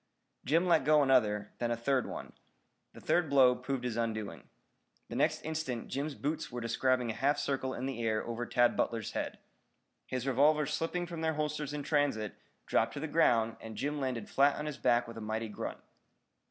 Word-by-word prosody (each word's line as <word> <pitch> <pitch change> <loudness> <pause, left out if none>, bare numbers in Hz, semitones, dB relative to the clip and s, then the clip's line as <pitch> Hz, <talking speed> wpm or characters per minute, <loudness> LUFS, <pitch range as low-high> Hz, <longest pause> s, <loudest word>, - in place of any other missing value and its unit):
Jim 165 +7 +2
let 165 -5 +4
go 150 +1 +5
another, 105 -6 +2
then 120 - 0
a 120 - 0
third 130 +2 +1
one. - - -7 0.6
The - - -12
third 175 -3 +2
blow 130 -3 +6
proved 125 +1 -4
his 120 -2 -2
undoing. 110 - -3 0.6
The - - -6
next - - +1
instant 155 -7 -3
Jim's 140 +1 -3
boots 150 0 -3
were 120 - -4
describing 120 +1 +1
a - - -4
half 145 +4 +1
circle 135 -2 -2
in 125 - -4
the 135 -3 -3
air 110 -1 0
over 120 +1 -4
Tad 120 0 +3
Butler's 115 -2 -1
head. - - -3 0.7
His 130 -1 -3
revolvers 150 +3 +3
slipping 175 +3 -1
from 170 -2 -6
their 160 -1 0
holsters 150 -1 -2
in 145 -1 -4
transit, 140 -9 0 0.3
dropped - - +1
to - - -3
the 160 - -3
ground 115 -8 +3
and 110 -1 -8
Jim 145 +2 -2
landed 125 -5 -2
flat 140 +1 +3
on 150 - -4
his 150 -3 -5
back 120 0 +3
with 115 -1 -8
a - - -8
mighty 110 +1 -3
grunt. 105 - -5
130 Hz, 195 wpm, -32 LUFS, 115-150 Hz, 0.7 s, blow